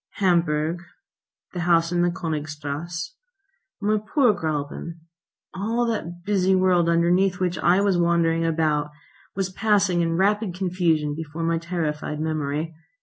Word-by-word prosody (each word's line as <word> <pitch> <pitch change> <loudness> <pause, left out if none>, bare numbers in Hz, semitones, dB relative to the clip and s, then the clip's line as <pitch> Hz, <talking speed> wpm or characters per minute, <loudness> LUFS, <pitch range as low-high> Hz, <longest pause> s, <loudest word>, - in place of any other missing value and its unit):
Hamburg, 170 -3 +1 0.7
the 180 - -4
house 170 -1 +2
in 175 0 +1
the 175 - +3
Königstrasse, 155 0 -4 0.7
my 215 +1 +1
poor 240 +2 +2
Gräuben, 155 -1 -4 0.6
all 225 +5 -1
that 175 -7 -4
busy 190 -1 +2
world 180 -2 +3
underneath 175 +3 +2
which 180 -1 -1
I 180 +3 +4
was 195 -3 +2
wandering 170 -1 +2
about, 155 -2 +1 0.5
was 190 -1 -2
passing 200 -3 +2
in 165 0 0
rapid 205 0 +1
confusion 170 -5 0
before 160 +1 -5
my 165 0 +1
terrified 155 -3 -3
memory. 155 0 -2
170 Hz, 130 wpm, -24 LUFS, 160-185 Hz, 0.7 s, I